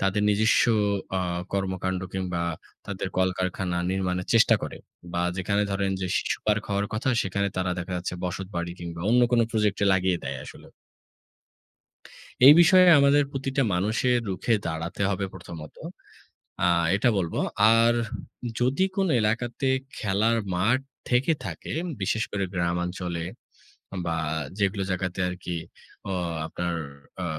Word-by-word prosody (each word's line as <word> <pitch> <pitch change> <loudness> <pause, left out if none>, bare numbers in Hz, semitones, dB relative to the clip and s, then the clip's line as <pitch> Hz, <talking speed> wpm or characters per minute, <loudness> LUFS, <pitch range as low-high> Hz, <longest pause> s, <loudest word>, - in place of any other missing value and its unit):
তাদের 100 +2 +1
নিজস্ব 110 +2 +4 0.6
আ - - 0 0.3
কর্মকান্ড 95 -1 -1
কিংবা 90 -2 -2 0.4
তাদের 100 -1 -4
কলকারখানা 95 -1 0
নির্মাণের 90 -1 -1
চেষ্টা 115 - +6
করে। - - -5 0.4
বা 85 - -1 0.2
যেখানে 100 +3 0
ধরেন 95 0 0
যে 95 - -1
শিশু - - 0
পার্ক 105 0 +2
হওয়ার 100 +1 0
কথা 110 +4 -1
সেখানে 100 +1 -1
তারা 90 -1 0
দেখা 90 +1 -5
যাচ্ছে 90 0 -4
বসতবাড়ি 90 -1 -4
কিংবা 85 -1 -7
অন্য 125 +1 +5
কোনো 120 -1 +5
প্রজেক্টে 105 -3 +1
লাগিয়ে 95 -1 +2
দেয় 70 -1 -4
আসলে - - -12 1.8
এই 145 - +12
বিষয়ে 185 +2 +7
আমাদের 140 +1 +5
প্রতিটা 135 0 -1
মানুষের 110 +7 +1
রুখে 95 +5 0
দাঁড়াতে 85 +4 -3
হবে 100 0 -1
প্রথমত। 85 -4 -10 0.9
আ - - +5 0.3
এটা 115 +5 +3
বলব। 85 -4 -2 0.4
আর 115 +1 +5 0.7
যদি 130 +8 +2
কোনো 190 -4 +1
এলাকাতে 120 +5 -1 0.3
খেলার 110 +3 +1 0.2
মাঠ 115 +9 +2 0.3
থেকে 125 +6 +3
থাকে, - - -6 0.3
বিশেষ 110 +3 0
করে 100 -1 -1
গ্রামাঞ্চলে, 90 -1 -2 0.8
বা 85 -1 -1 0.4
যেগুলো 100 0 +1
জায়গাতে 90 0 -2
আরকি 90 -1 -5 0.5
অ - - -1 0.3
আপনার 85 0 -3 0.5
আ - - -2
95 Hz, 130 wpm, -26 LUFS, 90-110 Hz, 1.8 s, এই